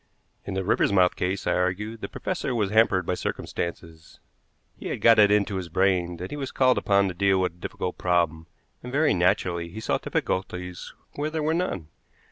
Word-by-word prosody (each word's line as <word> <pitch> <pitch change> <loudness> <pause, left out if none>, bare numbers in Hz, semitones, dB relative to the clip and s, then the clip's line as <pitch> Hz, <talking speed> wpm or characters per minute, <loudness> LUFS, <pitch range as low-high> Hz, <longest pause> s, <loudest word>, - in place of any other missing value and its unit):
In 100 - -5
the 95 - -1
Riversmouth 95 -2 +3
case, 95 +2 -2
I - - +2
argued, 105 +5 -2
the - - -5
professor 125 - -3
was 105 -4 0
hampered 105 -4 +3
by 90 - 0
circumstances. 85 -2 -5 0.6
He - - -8
had - - -3
got 115 -1 +6
it 105 -1 +7
into 105 -1 +2
his 90 -2 -5
brain 90 -1 +1
that 90 +2 -7
he 145 - -4
was 135 -2 -4
called 130 -1 +3
upon 100 -1 +3
to - - -5
deal 95 +1 +2
with 90 -1 +1
a 85 - -25
difficult 90 - -4
problem, 85 -2 0 0.3
and 125 - -8
very 150 0 +3
naturally 85 -1 +1
he 105 - -8
saw - - -1
difficulties 90 -1 -3 0.3
where 150 +1 -1
there 155 -1 -3
were 155 +1 +1
none. 130 - -2
95 Hz, 195 wpm, -25 LUFS, 90-110 Hz, 0.6 s, it